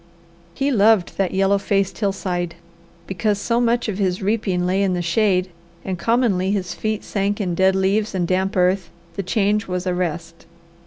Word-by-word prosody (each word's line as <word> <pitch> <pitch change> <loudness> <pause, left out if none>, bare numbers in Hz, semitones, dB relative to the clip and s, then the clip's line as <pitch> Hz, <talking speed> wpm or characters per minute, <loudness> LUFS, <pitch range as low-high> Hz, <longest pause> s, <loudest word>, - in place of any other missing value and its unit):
He 275 +1 0
loved 215 -5 +3
that 195 -2 0
yellow 195 +1 +2
faced 195 -1 -1
hillside. 180 -4 -2 0.5
Because 205 +2 -1
so 235 +3 0
much 235 0 +1
of 210 -2 -3
his 185 -2 0
reaping 195 -3 0
lay 185 +2 +1
in 190 -2 +1
the 175 - -1
shade 185 0 +1 0.3
and 185 -2 -3
commonly 220 -4 +1
his 190 -3 -1
feet 215 -1 -3
sank 200 +1 -1
in 185 -4 -1
dead 190 +2 +3
leaves 195 +2 +1
and 175 -2 0
damp 190 +2 0
earth, 180 0 +2 0.3
the 200 - -2
change 205 +3 0
was 180 0 -3
a 180 - 0
rest. 165 -2 -4
195 Hz, 175 wpm, -21 LUFS, 180-210 Hz, 0.5 s, loved